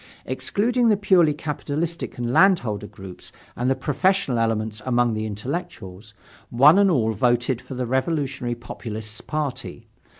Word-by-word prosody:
Excluding 235 +3 0
the 210 - +4
purely 185 -6 +4
capitalistic 155 +2 -4
and 120 0 -2
landholder 125 - +3
groups 95 -3 -11 0.2
and 125 +2 -1
the 135 - +2
professional 165 -4 0
elements 110 -1 -1
among 120 -1 +1
the 110 0 -2
intellectuals, 105 - -6 0.3
one 145 +10 +6
and 200 -1 +5
all 115 -9 +1
voted 120 +3 +1
for 130 - -9
the 125 0 -2
revolutionary 130 -1 -1
populists' 110 -3 -8
party. 150 -3 -4
125 Hz, 135 wpm, -23 LUFS, 110-165 Hz, 0.3 s, one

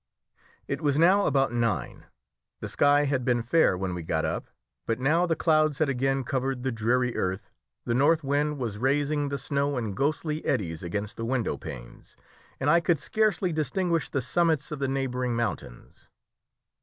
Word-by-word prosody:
It - - -3
was 145 -2 +1
now 185 +5 +4
about 135 -3 +2
nine. 120 -2 -2 0.5
The - - -5
sky 145 +1 +3
had 135 -3 0
been 120 -1 +1
fair 120 - +3
when 95 -1 -3
we 90 - -4
got 80 -1 -1
up, - - -3 0.4
but 115 +1 -1
now 160 +7 +2
the 165 - +1
clouds 155 -3 +2
had 155 -2 +1
again 135 +1 0
covered 130 0 -2
the 130 - 0
dreary 120 +2 0
earth, 95 +2 -3 0.3
the 120 - 0
north 150 +6 +3
wind 145 +2 0
was 115 -6 -4
raising 145 +3 +1
the 140 - -2
snow 140 -1 -1
in 110 -5 -3
ghostly 150 - -1
eddies 85 - -1
against 100 +4 -4
the 115 - -3
window 120 -3 -1
panes, - - -10 0.4
and 135 - -1
I 170 +3 +6
could 170 -1 +1
scarcely 195 +1 0
distinguish 165 +1 -1
the 140 - -2
summits 160 +1 +1
of 150 - -4
the 135 - 0
neighbouring 125 -2 -1
mountains. 105 - -5
135 Hz, 175 wpm, -27 LUFS, 120-150 Hz, 0.5 s, I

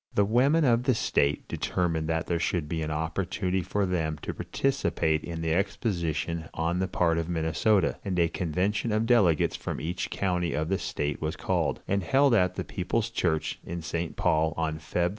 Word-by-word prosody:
The 100 - +4
women 135 +9 +3
of 120 -1 +3
the 130 -3 +3
state 70 -8 +1
determined 85 -3 -1
that 80 -1 0
there 85 -1 -1
should 85 -2 -1
be 80 +1 -2
an 80 - -2
opportunity 90 +4 -1
for 100 +3 -1
them 80 -4 -1
to - - -3
participate 80 - 0
in 85 -1 -5
the 80 0 +1
exposition 85 -4 -1
on 85 +2 0
the 95 - 0
part 85 -3 +1
of 85 +1 -3
Minnesota, 85 +4 +1
and 95 -3 -2
a 85 -1 +4
convention 90 +6 -1
of 110 +1 +1
delegates 105 -10 +3
from - - -4
each 85 +4 -3
county 90 -3 -1
of 80 +1 -1
the 95 - +1
state 75 -1 -3
was 80 0 -2
called, - - -1
and 100 0 +1
held 135 +8 +3
at 90 -4 +3
the - - -2
People's 110 +5 -2
Church, 80 -7 -1
in 85 -1 -5
St. 85 0 -3
Paul, 80 0 +1
on 80 -1 -1
Feb. 85 +2 0
85 Hz, 190 wpm, -28 LUFS, 80-100 Hz, -, The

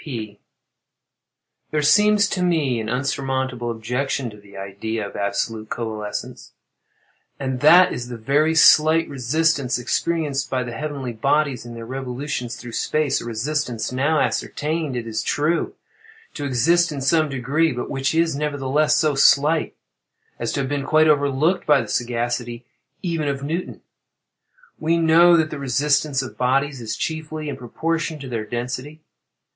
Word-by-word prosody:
P. 110 -8 -6 1.3
There 150 -1 0
seems 210 +6 +5
to 185 - -2
me 155 -9 +1
an 110 -1 -4
insurmountable 130 -1 -2
objection 125 +2 -2
to 105 - -13
the 100 -1 -15
idea 100 +2 -4
of - - -12
absolute 105 +2 -2
coalescence;—and 115 +4 -7
that 180 +6 +6
is 120 0 -5
the 120 -1 -7
very 145 +8 +1
slight 160 +1 +6
resistance 140 0 0
experienced 145 +2 -1
by 130 -1 -1
the 120 - -6
heavenly 135 0 -4
bodies 135 +1 0
in 120 - -8
their 115 0 -7
revolutions 125 -1 -4
through 120 +1 -9
space—a 150 +4 0
resistance 120 +1 -2
now 140 +5 +1
ascertained, 155 -2 -1
it 120 -2 -3
is 110 -1 -3
true, 155 +4 0 0.6
to 145 - -5
exist 165 +6 +2
in 145 - -4
some 155 +3 +2
degree, 140 +5 0
but 125 -1 -4
which 135 +3 -1
is, 165 -2 +2
nevertheless, 145 0 +1
so 155 -2 +2
slight 145 +3 +3 0.6
as - - -2
to - - -1
have 135 - -2
been 145 -1 -2
quite 155 +2 +4
overlooked 145 +4 +2
by 150 -2 +5
the 115 - -4
sagacity 120 +1 -2 0.4
even 165 -4 -1
of 140 -1 -2
Newton. 165 +5 -4 1.0
We 165 +2 +1
know 170 +1 +6
that 160 -1 +1
the 150 - -5
resistance 140 +1 +1
of 130 - -10
bodies 135 +1 +1
is, 110 -1 -4
chiefly, 155 -1 -4
in - - -4
proportion 160 +6 -3
to 140 -2 -8
their 115 -3 -3
density. 130 +6 -5
140 Hz, 150 wpm, -22 LUFS, 120-155 Hz, 1.3 s, that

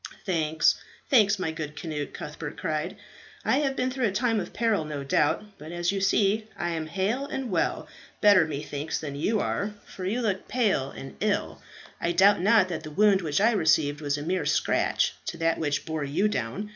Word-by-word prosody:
"Thanks, 160 -4 +2 0.3
thanks, 215 -5 +5
my 185 -4 -2
good 155 -2 -6
Cnut," 155 -4 -4
Cuthbert - - -7
cried. - - -2 0.5
"I 265 - +3
have 275 -2 0
been 255 0 0
through 255 -2 0
a - - -1
time 225 +2 +1
of 185 - -5
peril, 225 -7 +1
no 150 -2 -5
doubt; 175 +9 0
but 155 +2 -9
as 175 +1 0
you 195 -1 -2
see, 205 +2 +2
I 175 - -2
am 160 -1 -3
hale 205 - -1
and 265 -5 -4
well 170 - 0 0.3
better, 205 -6 +6
methinks 145 0 -4
than 145 -3 -5
you 210 +9 0
are, 210 +1 -2
for 185 - -9
you 215 +7 -1
look 200 -5 -1
pale 205 - +1
and 135 - -9
ill; 210 -1 -1 0.4
and 170 - -1
I - - 0
doubt 195 +2 +5
not 205 0 +5
that 170 -3 -3
the 155 - -8
wound 200 +4 +4
which 155 -2 0
I 220 +4 +4
received 155 -7 +2
was 145 -1 -1
a 145 - -5
mere 180 +3 -1
scratch - - +1
to 170 - -4
that 165 0 +1
which 145 -2 -1
bore 160 -2 -3
you 145 +9 +1
down. 130 - -3
185 Hz, 205 wpm, -27 LUFS, 155-210 Hz, 0.5 s, better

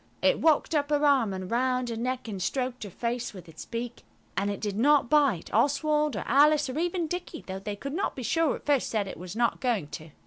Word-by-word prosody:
It - - +4
walked 320 +1 +3
up 290 -2 +1
her 295 0 +2
arm 265 -7 +4
and 185 0 -5
round 250 +1 +1
her 230 - -3
neck, 250 +2 -3
and 200 -4 -5
stroked 250 +5 -2
her - - -7
face 235 +3 -3
with 180 -2 -11
its 160 -1 -10
beak. 235 0 -5 0.3
And 200 +1 0
it 200 - -3
did 205 -2 -3
not 280 +3 +3
bite. 280 - +2
Oswald 300 +3 +2
or 200 - -3
Alice, 295 +3 +4
or 280 - -3
even 350 0 0
Dicky, 345 0 -5
though 190 0 -5
they 205 +1 -5
could 275 +7 -6
not 390 +5 -1
be 255 - -6
sure 325 +4 +1
at - - -12
first 285 -3 +1
that 210 -3 0
it - - -7
was 180 +2 -7
not 235 +1 +1
going 225 - 0
to. 155 +2 -8
250 Hz, 240 wpm, -28 LUFS, 205-295 Hz, 0.3 s, It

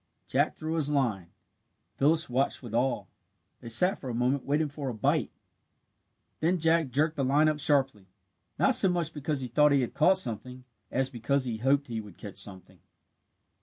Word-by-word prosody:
Jack - - 0
threw 155 +1 -4
his 155 -3 0
line 120 -11 -1 0.7
Phyllis 160 +4 +3
watched 130 +2 -1
with 115 -3 -9
awe. 125 +2 0 0.5
They 115 - -9
sat 180 - +4
for 130 - -7
a 120 - -4
moment 125 +3 0
waiting 150 +2 +1
for 145 -1 -5
a 120 - -5
"bite." 105 - 0 1.1
Then 175 +4 +1
Jack 165 -2 +2
jerked 155 +5 0
the 140 - 0
line 145 +4 +3
up 155 -1 0
sharply, 135 - +1 0.5
not - - +3
so 190 - +5
much 170 -3 -2
because 150 -1 -3
he 130 - -4
thought 150 +5 +3
he 140 - +3
had 120 - -3
caught 190 +5 +4
something, 125 - -3 0.3
as 130 +1 -1
because 130 +3 -1
he 115 -3 -3
hoped 135 +5 +1
he 115 -2 -4
would 105 -4 -14
catch 100 -2 -10
something. 95 -3 -8
135 Hz, 185 wpm, -28 LUFS, 120-155 Hz, 1.1 s, so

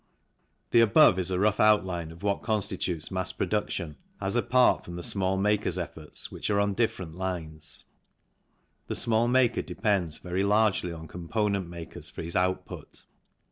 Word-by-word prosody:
The 120 - +6
above 105 -4 +6
is 90 0 -1
a 90 - 0
rough 105 +2 +2
outline 95 -6 +2
of 80 +4 -13
what 100 -1 0
constitutes 95 -6 -2
mass 95 0 -1
production, 95 -5 -2 0.2
as 95 +3 -1
apart 125 +1 +3
from 85 - -8
the 90 - -6
small 95 0 +2
makers' 105 -2 +1
efforts, 80 -3 -7
which - - -4
are 100 -1 +2
on 100 0 +1
different 95 -7 -1
lines. 80 -4 -6 1.0
The - - -3
small 115 0 +2
maker 125 -1 +3
depends 95 -8 -1
very 90 +1 -3
largely 105 -3 +2
on 80 -1 -8
components 100 +2 -2
makers 85 -1 -8
for - - -7
his 85 +1 -6
output. 90 0 -2
95 Hz, 155 wpm, -28 LUFS, 85-105 Hz, 1.0 s, The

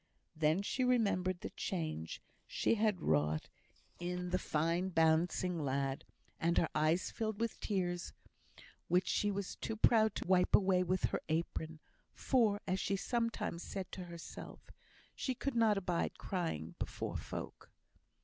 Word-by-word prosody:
Then 155 +4 +2
she 255 +5 0
remembered 200 -7 +2
the - - -5
change 155 - -3 0.2
she - - +1
had 210 -5 +1
wrought 75 0 +1 0.5
in 180 0 -3
the 185 - +2
"fine 170 +4 0
bouncing 165 +1 +2
lad," 135 0 -1 0.3
and 170 +1 +2
her 165 - +3
eyes 155 +4 +2
filled 220 -2 -2
with 230 -1 -2
tears, 175 -4 -1 0.8
which 180 +2 +3
she 205 - +2
was 200 -1 -3
too 225 - -3
proud 220 -1 +4
to - - -3
wipe 180 0 +5
away 190 -2 +4
with 185 0 0
her - - -1
apron; 160 0 -2 0.4
for, 220 -6 +2
as 185 +1 0
she 200 - 0
sometimes 230 -5 -1
said 190 0 -5
to 185 - -6
herself, 170 -1 -9 0.4
"she 260 - -2
could 275 +3 -2
not 225 -3 +4
abide 180 -3 -1
crying 125 - -3
before - - -3
folk." - - -6
180 Hz, 145 wpm, -35 LUFS, 165-205 Hz, 0.8 s, wipe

